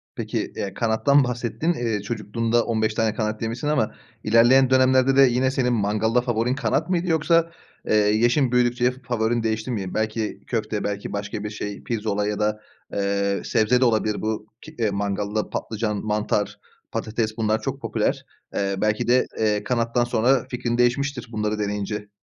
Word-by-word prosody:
Peki, - - -3
eee, 100 - -4
kanattan 130 +5 +3
bahsettin, 125 +7 -1
eee, 115 -7 -2
çocukluğunda 115 +2 -1
15 110 -1 0
tane 110 -1 +1
kanat 110 0 -2
yemişsin 115 +6 -3
ama 150 -8 0 0.3
ilerleyen 120 +4 +5
dönemlerde 130 0 +4
de 135 - +7
yine 130 0 +4
senin 125 -2 +1
mangalda 110 +3 +1
favorin 120 +1 0
kanat 140 +6 0
mıydı 180 0 0
yoksa, 165 +1 +2 0.4
eee, - - +2
yaşın 120 +5 +3
büyüdükçe 125 0 +2
fa 130 +1 -14
favorin 120 -1 0
değişti 110 +2 -1
mi 95 -5 -3
belki 110 0 -2
köfte 110 -3 -2
belki 100 0 -4
başka 100 +1 -4
bir 105 - -3
şey 105 -1 -6
pirzola 105 -3 -1
ya 105 0 -2
da, 105 0 0 0.3
eee, 100 0 0
sebze 125 +4 +2
de - - +5
olabilir 110 -2 +1
bu 110 0 -3
ki 155 0 -12 0.2
mangalda 100 +1 -2
patlıcan, 110 -1 -2
mantar, 105 -1 -1 0.3
patates 110 0 -2
bunlar 110 0 +1
çok - - -4
popüler. - - -1 0.3
Eee, 100 -1 -1
belki 105 +2 0
de, 125 +1 +4
eee, 105 -1 +1
kanattan 120 0 +1
sonra 120 +2 +2
fikrin 120 -1 -2
değişmiştir 125 +1 +1
bunları 105 -1 -2
deneyince. 105 0 -3
110 Hz, 160 wpm, -23 LUFS, 105-125 Hz, 0.4 s, de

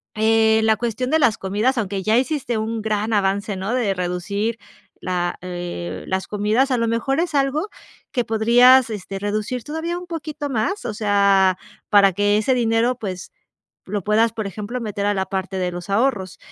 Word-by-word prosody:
eh, 220 0 +3
la 220 0 +3
cuestión 240 +3 -2
de 315 - +4
las 230 -7 +3
comidas, 210 +7 0
aunque 200 -3 -2
ya 215 +3 +3
hiciste 255 -3 -1
un 220 +1 -2
gran 215 0 -1
avance, 200 0 0
¿no?, 195 +5 -3
de 235 -6 +1
reducir 195 +5 -2 0.4
la, 175 -1 -2
eh, 175 - -6
las 190 0 -2
comidas, 215 +6 +1
a 255 - +2
lo 230 0 0
mejor 235 +5 0
es 335 -2 -1
algo 285 +7 +1 0.4
que 245 - +1
podrías, 240 +3 +5
este, 195 -2 -6
reducir 215 +4 -3
todavía 320 +3 -3
un 360 - -11
poquito 305 -3 -5
más, 315 - -2
o 215 - -3
sea, 200 -3 +3 0.3
para 200 -3 +5
que 205 +2 +2
ese 215 +5 +2
dinero, 235 0 +1
pues 190 -5 -6 0.6
lo 205 +1 -3
puedas, 220 +3 +2
por 220 -3 -4
ejemplo, 210 +6 -5
meter 205 -3 -3
a 205 - +2
la 190 -1 -1
parte 190 0 -3
de 180 -1 -1
los 175 +2 -7
ahorros, 200 -4 0
215 Hz, 180 wpm, -21 LUFS, 195-245 Hz, 0.6 s, podrías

